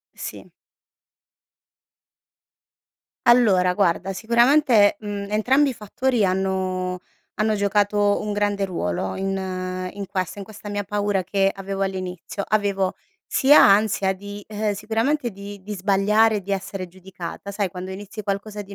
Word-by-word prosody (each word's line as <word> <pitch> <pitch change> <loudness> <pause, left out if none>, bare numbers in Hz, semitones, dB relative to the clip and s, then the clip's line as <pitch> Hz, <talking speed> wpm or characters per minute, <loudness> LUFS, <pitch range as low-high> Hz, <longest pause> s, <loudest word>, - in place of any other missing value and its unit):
Sì. - - -8 2.8
Allora 205 -7 +5
guarda, 190 0 +1
sicuramente, 235 0 +4
mhmm, 205 -1 -5
entrambi 265 +7 +3
i 255 - -6
fattori 225 +2 0
hanno 185 -1 -1 0.4
hanno 215 0 +1
giocato 205 0 +2
un 210 0 -3
grande 205 -1 0
ruolo 95 - -2
in 185 -1 -3
in 200 -1 -6
questo 185 +1 -3
in 200 - -6
questa 215 0 -10
mia 205 0 -2
paura 205 -1 0
che 195 +2 +1
avevo 195 0 -4
all'inizio. 185 0 -4
Avevo 200 -3 0 0.3
sia 285 +3 +5
ansia 200 -1 +4
di, 205 +1 -9
ehm, 215 0 -1
sicuramente 225 +6 -1
di 200 0 -10
di 210 - -7
sbagliare 205 +3 +3
e - - -2
di 200 - -8
essere 190 -1 -4
giudicata, 185 +1 -8
sai 200 -2 -1
quando 185 +1 -7
inizi 205 +2 -8
qualcosa 205 +1 -3
di 200 0 -11
200 Hz, 135 wpm, -23 LUFS, 190-210 Hz, 2.8 s, Allora